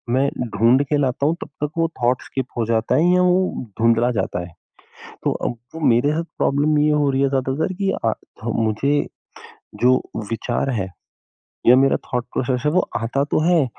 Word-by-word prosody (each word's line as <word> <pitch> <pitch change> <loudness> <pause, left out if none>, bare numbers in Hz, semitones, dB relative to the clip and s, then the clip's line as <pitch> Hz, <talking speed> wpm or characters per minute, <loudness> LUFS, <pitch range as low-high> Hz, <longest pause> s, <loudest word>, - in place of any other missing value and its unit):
मैं 135 +1 +3 0.3
ढूँढ़ 120 +6 +4
के 145 +1 0
लाता 135 -1 0
हूँ 160 +3 +2
तब - - -13
तक 150 - -1
वो 165 0 +2
थॉट 120 +1 +2
स्किप 130 -2 -4
हो 115 - +1
जाता 115 0 +1
है 175 +3 +4
या 180 - +4
वो 180 -6 +1 0.2
धुँधला 115 +1 +3
जाता 95 - -2
है। 85 - -17 0.7
तो - - +2 0.2
अब 120 +7 -9
मेरे 145 +6 +2
साथ 165 +2 -1
प्रॉब्लम 150 +2 +2
ये 150 +1 +3
हो 150 -1 +2
रही 135 0 +1
है 140 - +3
ज़्यादातर 135 +5 -1
कि 195 - +2
अ, 110 - +3
थ 115 0 -7
मुझे 115 +6 +1 0.8
जो 130 +1 +5 0.3
विचार 120 +3 -2
है, 100 -7 -2 0.8
या 125 +2 +8
मेरा 135 +1 +4
थॉट 125 -1 -2
प्रोसेस 125 0 -1
है 150 - +4
वो 185 - +4 0.2
आता 120 +5 -1
तो 150 - 0
है, 170 -3 +3
135 Hz, 190 wpm, -21 LUFS, 120-150 Hz, 0.8 s, या